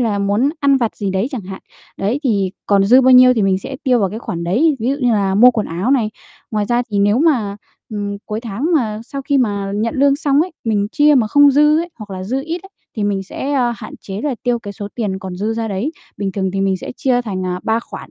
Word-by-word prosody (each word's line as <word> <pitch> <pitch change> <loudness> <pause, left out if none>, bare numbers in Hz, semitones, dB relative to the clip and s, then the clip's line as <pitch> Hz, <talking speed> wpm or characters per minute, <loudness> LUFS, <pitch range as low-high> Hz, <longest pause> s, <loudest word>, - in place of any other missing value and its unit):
là 215 -4 0
muốn 205 +7 +1
ăn 280 -1 +4
vặt 235 -4 -1
gì 200 -2 -2
đấy 190 +5 0
chẳng 245 -7 -5
hạn, 190 0 -8 0.3
đấy, 220 +9 -1
thì 200 -6 +1 0.2
còn 200 -1 +3
dư 250 +6 +6
bao 260 0 +4
nhiêu 255 0 +7
thì 220 - +1
mình 190 -1 +2
sẽ 265 +7 -7
tiêu 250 -2 +3
vào 195 -2 +1
cái 220 - -5
khoản 170 -8 -5
đấy, 275 - +2
ví 235 - -1
dụ 280 - 0
như 245 -2 +2
là 195 -2 +1
mua 245 +5 +7
quần 220 -3 -2
áo 180 +10 -2
này. 230 -6 +2 0.4
Ngoài 210 -2 0
ra 240 +3 +1
thì 200 - 0
nếu 205 +4 +3
mà, 240 -11 +1 0.3
ừm, 205 -1 -4
cuối 215 +1 -3
tháng 235 - -3
mà 220 -7 0
sau 275 +2 -6
khi 275 0 +1
mà 200 -5 -1
nhận 220 +2 -1
lương 280 +1 +3
xong 285 -1 +2
ấy, 355 +1 -1
mình 210 -3 +1
chia 300 -1 +4
mà 240 -5 +3
không 285 +5 +5
dư 300 +2 +4
ấy, 345 - -4
hoặc 210 -2 -9
là 185 - -6
dư 260 +6 -2
ít 335 +2 -4
ấy, 390 - -13 0.3
thì 210 - -1
mình 200 -1 -1
sẽ, 270 +8 -5
a, 245 -3 +1
hạn - - -9
chế 195 +1 -6
là 290 -4 -1
tiêu 245 -1 +1
cái 205 -3 -8
số 205 0 -7
tiền 205 -5 -2
còn 185 -1 -7
dư 215 +4 -2
ra 225 -1 -3
đấy. 210 +11 -2 0.2
Bình 195 -2 -3
thường 190 -2 -1
thì 195 - -2
mình 195 -1 +1
sẽ - - -7
chia 250 -2 +1
thành, 185 -5 -4
à, 180 0 -3
3 225 +1 0
khoản, - - -10
220 Hz, 270 wpm, -18 LUFS, 200-265 Hz, 0.4 s, nhiêu